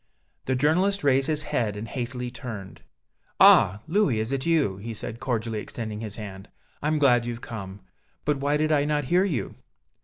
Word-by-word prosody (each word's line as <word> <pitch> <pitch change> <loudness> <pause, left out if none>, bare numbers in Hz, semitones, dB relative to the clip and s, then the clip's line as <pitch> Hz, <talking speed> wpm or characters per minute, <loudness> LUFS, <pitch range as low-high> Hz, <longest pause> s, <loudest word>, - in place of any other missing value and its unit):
The 130 - 0
journalist 180 +9 +2
raised 135 -1 +3
his 155 -1 0
head 105 -4 -1
and 110 +2 -5
hastily 125 -1 -4
turned. 110 -8 -8 0.6
"Ah! 105 +4 +6
Louis, 160 - +2
is 110 +3 -2
it 135 +2 -2
you?" 150 - +2
he 110 +3 -6
said, 115 +2 -6
cordially 115 -4 -2
extending 110 -1 -6
his 110 -2 -6
hand; 100 -3 -8 0.3
"I'm 155 +1 +1
glad 120 -5 +4
you've 120 0 -5
come. 100 -3 -7 0.4
But 150 -1 +1
why 145 +2 +1
did 155 +1 +1
I 145 -2 +3
not 150 0 0
hear 180 +1 +5
you?" 140 - -2
125 Hz, 180 wpm, -26 LUFS, 110-150 Hz, 0.6 s, Ah